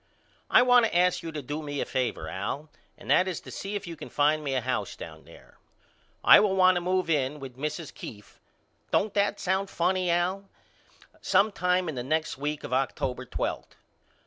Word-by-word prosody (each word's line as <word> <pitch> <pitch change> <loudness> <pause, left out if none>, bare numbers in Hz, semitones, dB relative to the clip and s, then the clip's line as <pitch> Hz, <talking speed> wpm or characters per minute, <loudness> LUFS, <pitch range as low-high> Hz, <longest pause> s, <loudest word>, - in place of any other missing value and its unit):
I - - +6
want 245 -2 +5
to 175 - -1
ask 180 0 +3
you 165 - -6
to 150 -2 -6
do 145 +4 -4
me 145 -2 -4
a - - -1
favor 125 -11 -2
Al 105 - -4 0.3
and - - -5
that 185 - +5
is 180 -3 -3
to - - -11
see 200 +1 -5
if 200 -1 -4
you 170 -1 -7
can - - -9
find 150 +1 +2
me 135 -2 -2
a 130 - +1
house 130 +1 -2
down - - -10
there. - - -17 0.6
I - - +9
will 205 -2 +2
want 185 -1 +6
to 175 - -1
move 185 0 0
in 150 -2 0
with 135 -3 -9
Mrs. 150 +3 -5
Keefe, 105 -3 -11 0.5
don't 210 0 +1
that 205 0 +1
sound 190 +1 0
funny 180 +1 0
Al? 185 +3 0 0.7
sometime 180 -3 +2
in 155 - -3
the 145 +5 -1
week 150 +1 -3
of - - -5
October 130 -1 -1
twelfth. - - -4
165 Hz, 195 wpm, -27 LUFS, 140-185 Hz, 0.7 s, I